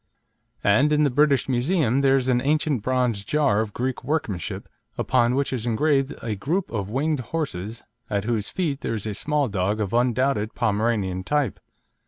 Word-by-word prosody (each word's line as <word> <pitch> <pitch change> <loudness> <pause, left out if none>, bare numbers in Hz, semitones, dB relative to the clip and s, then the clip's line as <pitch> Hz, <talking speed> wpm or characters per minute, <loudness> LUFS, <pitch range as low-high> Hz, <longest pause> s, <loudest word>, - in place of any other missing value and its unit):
and 120 +9 +4
in 150 0 +3
the 145 - +2
British 140 +1 +3
Museum 135 0 +1
there 135 -1 +4
is 130 -1 +1
an 125 -1 +2
ancient 150 -3 +1
bronze 125 -4 0
jar 140 -4 +2
of 110 -2 -3
Greek 125 +4 -3
workmanship, 120 - -3 0.3
upon 125 -1 +2
which 140 0 0
is 120 -2 -2
engraved 135 +3 +1
a 115 - -2
group 160 - -2
of 100 -3 -3
winged 145 +5 0
horses 120 - -4 0.3
at 100 -1 -1
whose 110 -2 -1
feet 155 -7 -2
there 115 - -2
is 105 - -4
a 105 - -2
small 145 +6 0
dog 100 0 -1
of 105 -1 -2
undoubted 120 -2 +1
Pomeranian 105 -4 0
type. 145 -2 0
125 Hz, 175 wpm, -24 LUFS, 110-140 Hz, 0.3 s, and